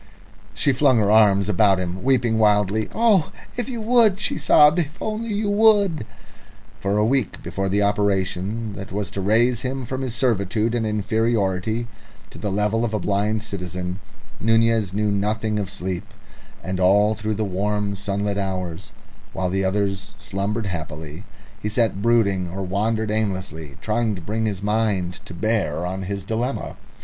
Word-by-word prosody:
She 140 - +3
flung 130 -1 +4
her 105 -2 +3
arms 100 -3 +5
about 100 -1 +3
him, 90 0 -4
weeping 120 -4 +2
wildly. 105 0 +2
"Oh, 220 -8 +3 0.2
if 245 +1 -3
you 240 -3 -4
would," 225 -3 +4
she - - 0
sobbed, 150 +3 +6
"if 160 +1 -3
only 220 +2 -3
you 205 +1 -1
would!" 205 - +3 0.7
For 100 +1 0
a 105 - +3
week 130 -1 0
before 95 0 -2
the 100 +2 +2
operation 100 +1 0
that 95 -1 -8
was 100 +1 -3
to 100 - -4
raise 115 +4 +3
him 130 0 -3
from 130 +3 -4
his 125 -3 -3
servitude 110 -2 0
and 115 -2 0
inferiority 110 0 0 0.5
to - - -11
the 105 - -2
level 105 +3 +1
of 110 -2 -1
a - - 0
blind 105 +3 0
citizen, 90 -2 -5 0.4
Nunez 115 -2 +2
knew 105 +1 0
nothing 105 +1 -1
of 100 -2 -3
sleep, 95 -2 -4 0.6
and 95 +1 -3
all 100 +3 +4
through 110 0 -3
the 110 +1 -1
warm 100 +2 -1
sunlit 100 +1 -2
hours, 95 0 -4 0.4
while 90 -1 -1
the 95 +1 0
others 100 0 -1
slumbered 100 +4 -3
happily, 80 -1 -6 0.4
he 105 - -2
sat 110 -3 0
brooding 100 -6 +2
or 95 +3 -4
wandered 105 +3 -1
aimlessly, 95 -9 -3
trying 110 -1 0
to 90 - -8
bring 110 +6 -2
his 100 -2 -3
mind 105 -4 0
to 90 - -8
bear 90 -5 0
on 95 +2 -3
his 100 +1 -4
dilemma. 115 +6 -3
105 Hz, 165 wpm, -22 LUFS, 95-115 Hz, 0.7 s, sobbed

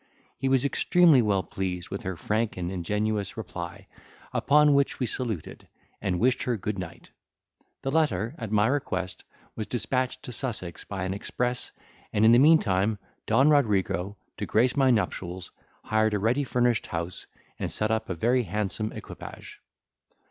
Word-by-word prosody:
He 135 - -1
was 135 0 +3
extremely 160 -1 +5
well 100 -4 +1
pleased 90 0 -4
with 100 - -4
her 95 -2 -4
frank 110 +5 -1
and 90 0 -3
ingenuous 105 +3 -2
reply, 90 -5 -6 0.5
upon 150 0 +4
which 140 0 +2
we 130 - +1
saluted, 115 - -4 0.3
and 95 -4 -1
wished 125 +2 +2
her 120 -2 0
good 105 0 -3
night. 85 -2 -8 0.7
The 135 - -1
letter, 115 - +1
at 115 -4 -5
my 105 0 +4
request, 95 -8 -2 0.3
was 110 - -4
dispatched 125 +3 -1
to - - -6
Sussex 105 - -3
by 95 -1 -5
an 95 0 -2
express, 125 +5 -2 0.4
and 105 +1 +3
in 110 - +8
the 120 - +7
meantime, 110 - +4 0.3
Don 140 +3 +5
Rodrigo, 100 - +1 0.2
to - - -3
grace 120 +3 +3
my 135 -2 +4
nuptials, 95 -6 -1 0.3
hired 110 -1 +2
a - - 0
ready 120 +8 +2
furnished 120 -2 +1
house, 85 +1 -4 0.3
and - - -2
set 110 +1 0
up 110 0 -1
a 90 - -2
very 120 +9 +2
handsome 105 +1 -2
equipage. - - -10
110 Hz, 160 wpm, -27 LUFS, 95-125 Hz, 0.7 s, in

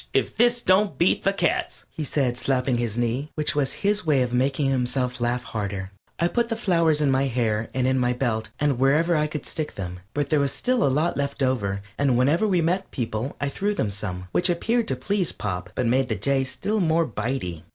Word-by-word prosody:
If - - +1
this 240 +1 +3
don't 185 -5 +3
beat 170 - +3
the 195 - +2
cats," 180 -4 -1
he 155 - -5
said, 135 -4 0
slapping 125 -1 0
his 115 -2 -1
knee, 120 +5 -1
which 150 -1 -1
was 140 -2 +1
his 210 +1 +3
way 145 -6 +3
of 125 -1 -3
making 135 +2 +1
himself 125 -1 -1
laugh 120 +1 0
harder. 100 -4 -4 0.3
I 170 - +3
put 235 +5 0
the 225 - -1
flowers 170 -8 +2
in 145 -2 +3
my 135 +1 +2
hair 115 -3 0
and 130 -1 0
in 130 0 +2
my 125 0 +2
belt 120 -3 -1
and 145 -4 +1
wherever 155 +6 +3
I 150 -1 +2
could 150 0 -6
stick 155 -2 -4
them. 90 -2 -5 0.2
But 145 -1 -1
there 155 - +4
was 140 -1 +2
still 250 -3 +1
a - - +4
lot 155 +6 +1
left 140 0 -2
over, 100 -7 0 0.2
and 135 -4 +3
whenever 150 - +3
we 185 -4 +2
met 180 +4 0
people 115 +1 -3
I 145 - -1
threw 205 +8 -1
them 105 - -1
some, 90 -3 -5
which 180 +1 +2
appeared 225 +7 +1
to - - -1
please 200 -4 -1
Pop, 90 -3 -4
but 125 - 0
made 130 +2 +2
the 110 - 0
Jay 135 +7 +1
still 200 +11 -2
more 165 -2 +2
bite 125 +3 -3
y. 85 -3 -5
135 Hz, 225 wpm, -24 LUFS, 120-165 Hz, 0.3 s, there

